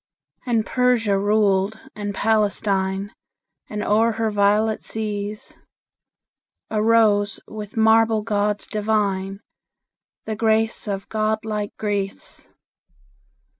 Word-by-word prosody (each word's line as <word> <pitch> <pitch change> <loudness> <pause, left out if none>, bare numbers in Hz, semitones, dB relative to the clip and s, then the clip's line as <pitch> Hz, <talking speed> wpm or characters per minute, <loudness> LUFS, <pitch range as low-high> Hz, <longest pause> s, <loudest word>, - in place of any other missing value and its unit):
And 230 -3 +1
Persia 245 -5 +2
ruled 205 0 +1 0.2
and 205 -1 -4
Palestine; 200 -2 0 0.6
And 210 -1 -3
o'er 225 +2 +2
her 225 0 -1
violet 210 +2 +2
seas 210 -1 -5 1.1
Arose, 215 -2 +3
with 210 0 -8
marble 220 0 +4
gods 210 -1 0
divine, 205 -2 -1 0.8
The 220 - -3
grace 220 0 +1
of 195 -1 -4
god 215 0 -1
like 210 -2 -4
Greece. 200 -2 -4
210 Hz, 95 wpm, -22 LUFS, 205-220 Hz, 1.1 s, marble